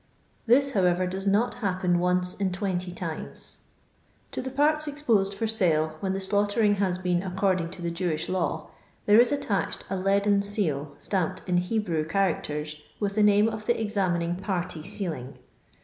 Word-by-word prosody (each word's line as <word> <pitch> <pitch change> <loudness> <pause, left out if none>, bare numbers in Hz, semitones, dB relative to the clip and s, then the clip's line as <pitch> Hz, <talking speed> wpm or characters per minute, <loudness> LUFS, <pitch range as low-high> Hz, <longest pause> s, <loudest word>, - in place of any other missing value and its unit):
This, 275 +4 +4
however, 185 -4 +2
does 190 +2 -3
not 215 +5 +2
happen 185 -3 +1
once 180 0 +1
in 195 -2 -1
20 185 -1 -2
times.' 170 -3 -6 0.7
To - - -3
the 260 - -4
parts 300 +3 +2
exposed 230 -10 +1
for 225 - -2
sale, 160 -8 +1
when 190 +1 -1
the 195 - -2
slaughtering 205 +2 +2
has 190 -2 0
been 180 -1 0
according 185 -2 0
to 180 0 -8
the 170 - -1
Jewish 170 -2 -2
law, 185 -2 -2 0.3
there 210 +2 +6
is 245 - +2
attached 220 -9 -1
a - - 0
leaden 200 +1 +2
seal, 155 -9 -1
stamped 185 -5 -2
in 180 -1 +2
Hebrew 180 -3 0
cha 195 +5 +2
racters 150 0 -5 0.2
with 200 -1 -1
the 215 - +1
name 210 +1 +5
of 220 -1 -5
the 240 - +3
examiniM 185 -5 -1
party 180 -5 -3
sealing. 155 -7 -5
190 Hz, 165 wpm, -27 LUFS, 175-205 Hz, 0.7 s, there